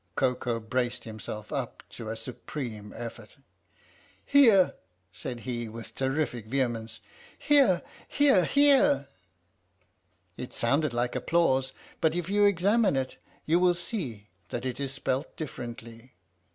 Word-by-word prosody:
" - - -43
Koko 125 -2 0
braced 120 +1 -2
himself 110 +1 -7
up 135 -5 -4
to 115 -2 -7
a 110 - -3
supreme 115 -3 -6
effort. 115 0 -8 0.5
" - - -29 0.3
Here! 230 -10 +6 0.2
" 90 - -44
said 120 +2 -6
he 120 0 -4
with 115 +1 -9
terrific 130 -4 -1
vehemence. 115 -3 -2 0.4
"Here 275 - +4 0.2
here 280 -11 +4
here! 270 - +4 0.6
" 90 +1 -41 0.5
(It 125 - -7
sounded 140 +5 +1
like 120 +1 -1
applause, 130 -1 +2 0.3
but 160 0 +2
if 175 0 -2
you 205 +1 +4
examine 200 0 +3
it 130 -1 -2 0.3
you 165 +3 +3
will 180 -1 +4
see 145 - -5 0.2
that 120 - -4
it 125 0 -3
is 140 -1 -2
spelt 135 0 -3
differently.) 120 -4 -8
130 Hz, 140 wpm, -28 LUFS, 115-170 Hz, 0.6 s, Here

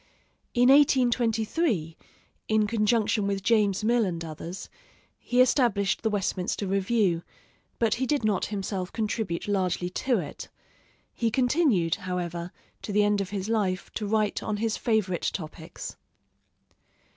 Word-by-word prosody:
In 245 +1 +5
1823, 240 - +3 0.5
in 215 -1 +3
conjunction 215 -1 +1
with 195 -1 -2
James 210 -3 +2
Mill 235 +1 +3
and 170 -4 -3
others, 165 +4 -7 0.5
he 245 - -1
established 235 -6 +3
the 220 - +1
Westminster 200 -1 -1
Review, 195 -2 +1 0.6
but 230 -2 +2
he 260 +2 -1
did 290 -3 0
not 205 -4 +1
himself 195 -2 -3
contribute 215 -5 -2
largely 185 -3 0
to 245 +5 0
it. 155 -7 -6 0.6
He 230 - 0
continued, 245 - +2 0.2
however, 175 -1 -3 0.3
to - - -5
the 210 +1 +3
end 205 -1 +2
of 190 - -4
his 200 -1 -4
life 200 -5 -1
to 210 - -3
write 215 -1 +1
on 215 -1 -2
his 225 +1 0
favorite 210 -6 0
topics. 160 -2 -7
210 Hz, 135 wpm, -27 LUFS, 185-230 Hz, 0.6 s, In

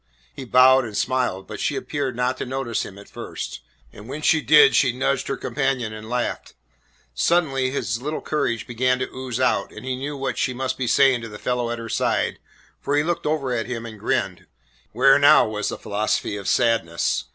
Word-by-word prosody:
He 130 - -8
bowed 130 +2 +6
and 110 -4 -6
smiled, 125 -7 -1
but - - -8
she - - -1
appeared 135 -4 -3
not 125 +1 0
to - - -3
notice 130 -3 -2
him 100 - -10
at 100 - -13
first, - - -7 0.3
and 105 +4 -12
when 150 +3 -6
she 160 +1 +4
did 150 +1 +6
she 130 - +4
nudged 130 +3 -1
her 135 - -2
companion 135 -6 -2
and 110 +1 -9
laughed. 125 0 -3 0.6
Suddenly 135 - +1
his 115 -4 -2
little 150 +3 -3
courage 140 -7 -2
began 125 0 +1
to 130 - -3
ooze 130 -2 -4
out, 130 - +1
and - - -10
he 130 -1 -2
knew 140 +3 -5
what 135 0 -3
she 130 - 0
must 130 0 -2
be 130 -2 -3
saying 135 -1 +4
to 115 - -7
the 105 - -9
fellow 125 +1 -2
at 120 - -3
her 115 0 -7
side, - - 0 0.4
for 145 +1 -1
he 145 - +3
looked 170 0 -2
over 145 -4 -1
at 115 -2 -2
him 115 -2 -5
and 110 -2 -9
grinned. - - -2 0.4
Where - - +5
now - - +6
was 105 -1 -2
the - - -5
philosophy 105 0 -2
of 100 -1 -6
Sadness? 115 -9 +1
125 Hz, 210 wpm, -23 LUFS, 115-135 Hz, 0.6 s, bowed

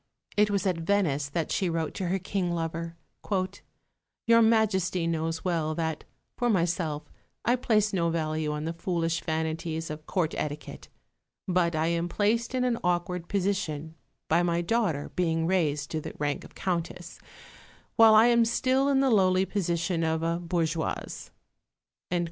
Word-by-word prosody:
It 210 0 +4
was 200 0 0
at 185 -3 +1
Venice 165 -6 +1
that 160 +2 -2
she 185 - +1
wrote 165 -2 -2
to 185 - -3
her 185 +3 +1
King 185 -1 -2
lover, 165 0 -3 1.3
"Your 230 0 +6
Majesty 195 -6 +2
knows 165 0 -2
well 160 -3 0
that, 160 -2 -2 0.3
for 245 - 0
myself, 170 -6 0 0.4
I 240 - +4
place 215 -4 +1
no 170 -3 +1
value 155 -2 -1
on 150 +1 -3
the 165 - -2
foolish 165 -1 -1
vanities 160 0 -2
of 155 0 -8
Court 175 -5 0
etiquette; 150 0 -5 0.6
but 175 -2 +2
I 155 +1 +1
am 170 0 -1
placed 230 +6 0
in 255 - +1
an 245 -2 +1
awkward 175 0 -1
position 180 -6 -1 0.3
by 165 +2 +3
my 170 -1 +1
daughter 175 -6 0
being 165 -2 +1
raised 150 -5 0
to 155 - -2
the - - -7
rank 145 -1 -2
of - - -14
Countess, 175 -1 -3 0.8
while 225 -1 +7
I 220 +2 +8
am 235 -1 +5
still 260 +4 +2
in 270 -1 +3
the 270 -2 +3
lowly 190 -3 +4
position 175 -3 -1
of 160 0 0
a 170 +1 0
bourgeoise." 165 -2 -2
170 Hz, 155 wpm, -28 LUFS, 160-200 Hz, 1.3 s, I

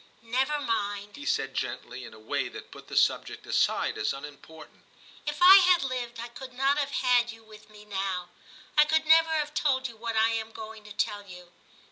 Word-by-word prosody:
' - - -32
Never 265 +6 0
mind,' 205 -5 -3
he 290 0 -9
said 135 0 0
gently, 125 0 -5
in - - -10
a - - -14
way 110 - -2
that - - -11
put - - -13
the - - -4
subject - - +1
aside - - +1
as - - 0
unimportant. 150 +3 -12 0.2
* - - -23
If 300 +4 -1
I 380 +2 +11
had 360 -4 +5
lived 245 -3 -4
I 235 +1 -6
could 255 +2 -10
not 275 +3 +2
have 285 -1 -1
had 245 -3 +2
you 225 0 -14
with 215 -1 -16
me 210 0 -15
now. 190 -3 -3 0.5
I 300 - +7
could 315 +1 +1
never 325 +1 +6
have 300 -2 -1
told 265 -3 +1
you 235 - -12
what 230 0 -4
I 220 +1 +4
am 225 0 -3
going 220 0 -9
to 210 - -12
tell 205 0 -2
you. 180 -1 -12
230 Hz, 215 wpm, -28 LUFS, 205-280 Hz, 0.5 s, I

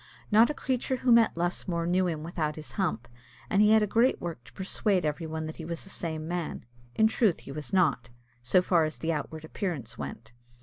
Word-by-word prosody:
Not 220 +4 +6
a 300 - -2
creature 260 0 -1
who 255 0 +1
met 230 -6 +5
Lusmore 175 0 -1
knew 180 +2 +2
him 155 -3 -3
without 155 -2 -2
his 155 -1 -9
hump, 160 - -2 0.4
and 195 - +4
he 210 - +6
had 220 0 +6
a - - +3
great 230 +5 +2
work 165 -8 -6
to - - -16
persuade 190 -1 0
every 155 +2 -2
one 160 0 -4
that 155 - -7
he 165 - -7
was 165 0 -5
the 195 - -10
same 160 -2 -4
man 175 -7 -4 0.3
in 220 - +4
truth 220 -4 +2
he - - -9
was 150 +1 -6
not, 160 -10 +2 0.3
so 155 +10 +3
far 175 -3 +3
as 155 0 -3
the 165 0 -1
outward 155 +1 -5
appearance 145 - -4
went. 110 0 -7
170 Hz, 220 wpm, -28 LUFS, 155-200 Hz, 0.4 s, Not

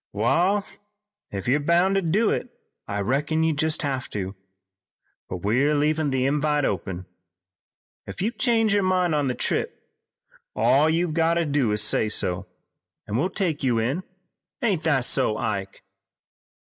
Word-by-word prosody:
"Wa'al, 180 - +2 0.6
if 100 +1 -6
you're 135 +4 +3
boun' 170 +5 +2
to 195 - +2
do 195 +6 +2
it 250 - -2 0.4
I 100 0 -2
reckon 145 +8 0
you 160 0 +2
jest 155 +2 0
have 135 -3 -2
to, 95 -2 -4 1.0
but 90 -2 -6
we're 130 +9 +2
leavin' 150 +1 +1
the 130 -1 0
invite 150 +1 +1
open. 90 -1 -3 1.0
Ef - - -8
you 210 +5 0
change 225 -4 +1
your 205 - +3
mind 185 -3 +1
on 145 -2 +1
the 125 - -1
trip - - -1 0.8
all 145 +4 +4
you've 165 0 0
got 165 +1 +2
to 170 -1 +1
do 140 -6 +1
is 105 0 +1
to - - +4
say 110 - +2
so, 95 -2 -1 0.6
an' 105 - -3
we'll 165 +9 +1
take 180 -6 -1
you 125 -4 +1
in, 125 +10 0 0.6
ain't 200 -9 +1
that 135 -6 +2
so, 105 - +1
Ike?" 100 -2 -4
150 Hz, 160 wpm, -24 LUFS, 115-170 Hz, 1.0 s, all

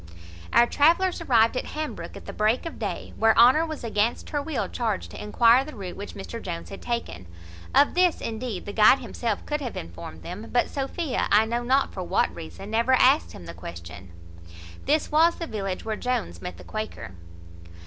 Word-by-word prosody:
Our 240 - +6
travellers 340 +8 +3
arrived 230 -6 +3
at - - -2
Hambrook[*] 310 0 -5
at - - -12
the - - -7
break 215 +7 +1
of 330 - -7
day, - - -4
where 225 0 +4
Honour 260 +8 +6
was 310 -4 -6
against 220 0 -1
her 290 - 0
will 305 0 -2
charged 220 -5 -3
to - - -8
enquire 235 +4 +5
the 305 -1 -10
route 190 -4 -7
which 205 - -8
Mr 230 +4 -7
Jones 170 -2 -6
had 195 - -9
taken. 230 - -4 0.5
Of 285 - +5
this, 360 -1 +3
indeed, 220 -3 -4
the 205 - -6
guide 215 +5 +6
himself 230 -6 -3
could 295 0 -2
have 250 -4 -5
informed 85 -1 -8
them; 205 +6 -7
but 245 - +1
Sophia, 275 +2 -2
I 210 +2 +6
know 235 +2 -1
not 265 +3 +1
for 190 - -5
what 180 - +1
reason, 85 - -9
never 235 +4 +2
asked 265 +4 +4
him 85 - -11
the 85 - -8
question. 85 +2 -9 0.4
[*] 85 0 -15
This 300 +2 +1
was 325 +3 +4
the 335 - -5
village 195 - -4
where 220 -1 -2
Jones 90 - -3
met 90 -2 -6
the - - -12
Quaker. 215 - -6
225 Hz, 200 wpm, -25 LUFS, 190-270 Hz, 0.5 s, Our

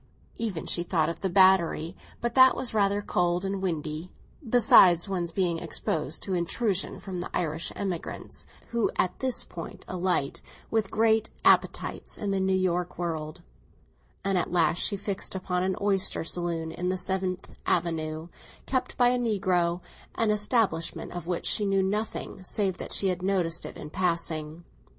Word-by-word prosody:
Then 210 -8 -3
she 175 - 0
thought 165 -2 +1
of 165 - -6
the 190 - 0
Battery, 185 -2 +4 0.3
but 235 0 -1
that 260 +1 +7
was 250 - -4
rather 205 -1 +2
cold 175 0 0
and 195 0 -2
windy, 160 -2 -3 0.4
besides 195 -7 +6
one's 175 -3 -2
being 170 -2 0
exposed 155 -1 -2
to 195 - -3
intrusion 185 +3 -1
from 185 -3 -6
the 175 - -5
Irish 165 -1 -1
emigrants 185 -4 -5 0.2
who 235 -2 +1
at 185 - 0
this 260 -2 +2
point 165 -2 -9
alight, 180 -6 -1 0.3
with 220 -3 0
large 220 0 +3 0.2
appetites, - - +2
in 205 -2 -2
the 195 - +1
New 190 -1 +2 0.2
World 165 -1 -4 0.8
and 195 -2 +2
at - - -2
last 170 -1 +2
she 200 - +2
fixed 200 -1 -3
upon 180 -1 -1
an 190 0 0
oyster 195 -4 +1
saloon 165 -1 -1
in 180 +2 -3
the 185 - 0
Seventh 185 0 -2 0.2
Avenue, 160 -1 -1 0.4
kept 260 -1 -2
by 245 -1 +5
a 250 0 +1
negro—an 185 -1 -1
establishment 210 -5 0
of 175 -1 -6
which 175 -1 -2
she 210 - +3
knew 195 -1 +2
nothing 205 -1 -3
save 190 -1 -1
that - - -7
she 195 - +3
had 180 -1 -2
noticed 180 -3 0
it - - -10
in 150 - -8
passing. 165 -3 -2
185 Hz, 160 wpm, -27 LUFS, 170-200 Hz, 0.8 s, that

